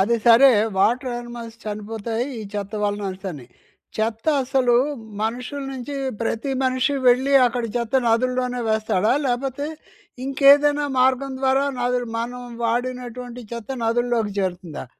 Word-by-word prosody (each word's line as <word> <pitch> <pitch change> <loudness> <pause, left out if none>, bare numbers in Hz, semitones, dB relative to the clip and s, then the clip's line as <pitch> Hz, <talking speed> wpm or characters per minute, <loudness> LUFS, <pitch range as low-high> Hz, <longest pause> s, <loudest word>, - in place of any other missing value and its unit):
అది 235 +5 +3
సరే, 240 +4 +8 0.3
water 245 +5 +2
animals 240 -1 -8
చనిపోతాయి, 220 +2 -3
ఈ - - -5
చెత్త 200 0 -4
వలననేసని. 190 -8 -3 0.5
చెత్త 220 +4 -2 0.2
అసలు 255 -2 +2 0.5
మనుషుల 250 +5 -3
నుంచి 270 +2 -6 0.3
ప్రతి 230 +4 -2
మనిషి 255 +2 +1
వెళ్ళి 260 +3 +4
అక్కడ 240 0 -2
చెత్త 240 +2 0
నదుల్లోనే 250 +1 +1
వేస్తాడా? 215 -1 +1
లేపోతే 265 +4 -2 0.6
ఇంకేదైనా 285 +2 +5
మార్గం 265 +1 +2
ద్వారా 270 +1 +2 0.2
నదులు 245 0 0
మనం 245 +2 -4 0.2
వాడినటువంటి 245 +1 -3
చెత్త 235 +1 -6
నదుల్లోకి 230 -2 0
చేరుతుందా? 180 -6 -4
245 Hz, 115 wpm, -22 LUFS, 225-260 Hz, 0.6 s, సరే